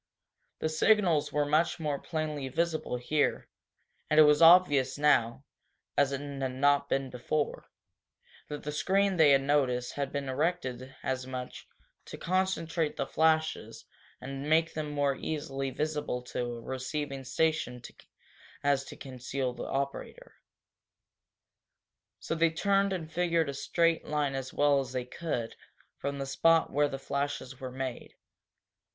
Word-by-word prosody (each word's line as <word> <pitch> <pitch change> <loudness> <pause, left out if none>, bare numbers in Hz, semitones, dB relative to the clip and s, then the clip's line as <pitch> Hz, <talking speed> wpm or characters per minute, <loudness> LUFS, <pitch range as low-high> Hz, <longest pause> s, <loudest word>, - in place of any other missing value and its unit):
The 155 - -1
signals 170 -2 +3
were 150 0 +1
much 160 +4 +1
more 150 -3 -2
plainly 155 -4 -3
visible 160 -4 -1
here, 145 +5 0 0.6
and 155 - +4
it - - +11
was 150 0 +5
obvious 150 -6 +6
now, 140 -4 +2 0.5
as 140 -1 +3
it 140 - -2
had 135 -3 -4
not 140 +1 +3
been 135 -1 -1
before, 145 +4 -2 0.8
that 150 0 -6
the 150 - -3
screen 195 +5 +1
they 160 -3 +6
had 135 -1 +5
noticed 130 -4 +1
had 140 -1 -3
been 140 -1 -3
erected 130 -3 -2
as 130 -1 -2
much 130 -1 -7 0.4
to - - -8
concentrate 170 -4 -1
the - - -1
flashes 160 0 0 0.3
and 135 +3 -6
make 160 +1 +3
them 155 -1 -3
more 145 -2 0
easily 135 -2 -3
visible 150 -2 -2
to 125 0 -3
a 120 -1 -5
receiving 135 +2 -4
station 135 -2 0 0.8
as 140 -1 +2
to - - -10
conceal 130 -1 -4
the - - -6
operator. 140 - -4 1.9
So - - -3
they 165 0 +3
turned 195 +4 +1
and 165 -4 -4
figured 170 -3 +1
a - - -3
straight 165 +4 +1
line 150 -2 0
as 135 -1 -4
well 145 -1 +3
as 130 -2 -5
they 125 -1 -2
could 125 -4 -4 0.4
from 140 0 -3
the 135 - -3
spot 165 +4 +3
where 145 +1 +3
the 135 - -4
flashes 140 -1 -4
were 130 -1 -6
made. 130 -1 -6
145 Hz, 145 wpm, -30 LUFS, 135-160 Hz, 1.9 s, it